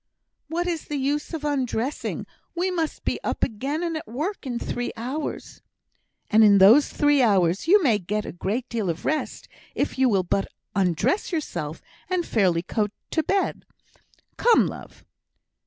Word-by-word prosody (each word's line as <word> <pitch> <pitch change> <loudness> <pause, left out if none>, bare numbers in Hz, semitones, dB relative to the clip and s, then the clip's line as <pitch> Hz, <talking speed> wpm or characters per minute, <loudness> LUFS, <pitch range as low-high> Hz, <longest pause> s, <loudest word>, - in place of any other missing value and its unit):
"What 335 +3 -2
is 340 -3 -2
the 295 - -4
use 285 +2 -1
of 315 -3 -4
undressing? 265 -2 -2 0.3
We 365 +2 0
must 330 -3 -2
be - - 0
up - - -2
again 275 +8 -2
and 335 -1 -2
at 315 - -5
work 300 - -4
in 240 -2 -2
three 245 +1 -3
hours." 260 +7 -5 0.7
"And 220 +1 +6
in 205 -2 +7
those 220 +10 +7
three 290 -1 +3
hours 195 - +2
you 395 +2 +6
may 230 -7 +3
get 210 +3 -3
a - - -5
great 215 +8 -3
deal 220 -6 -2
of 170 +1 -4
rest, 310 +1 -2 0.3
if - - -2
you 260 -1 +5
will 195 -4 +2
but 195 +2 0 0.3
undress 195 - +1
yourself 170 - -4 0.3
and 365 -2 0
fairly 180 -6 +2
go 210 +2 0 0.2
to 320 - +2
bed. 390 +5 -1 0.7
Come, 475 -1 +5
love." - - -9
260 Hz, 165 wpm, -24 LUFS, 205-315 Hz, 0.7 s, in